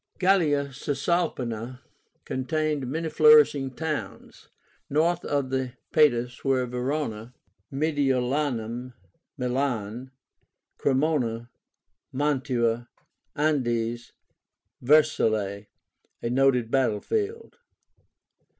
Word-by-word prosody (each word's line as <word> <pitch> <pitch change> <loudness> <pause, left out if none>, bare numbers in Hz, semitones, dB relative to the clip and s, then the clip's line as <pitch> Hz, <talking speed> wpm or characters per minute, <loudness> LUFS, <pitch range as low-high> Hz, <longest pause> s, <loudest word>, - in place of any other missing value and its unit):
Gallia 160 -7 +2
Cisalpína 130 -5 -2 0.5
contained 150 +1 -1
many 160 +4 -2
flourishing 445 - +5
towns. 155 0 -5 0.4
North 165 +4 +1
of 140 -2 -1
the 130 -2 -2 0.2
Padus 125 -6 +2
were 130 -2 +1
Veróna, 125 -2 -3 0.4
Mediolánum 130 -4 -1 0.4
(Milan), 125 -2 -2 0.7
Cremóna, 130 -5 0 0.6
Mantua, 125 -4 0 0.5
Andes, 120 -6 -1 0.7
and 125 - -9
Vercellae, 110 -10 +2 0.6
a 115 - -1
noted 125 -3 +2
battle 125 -6 +2
field. 450 +2 -3
135 Hz, 75 wpm, -26 LUFS, 120-150 Hz, 0.7 s, flourishing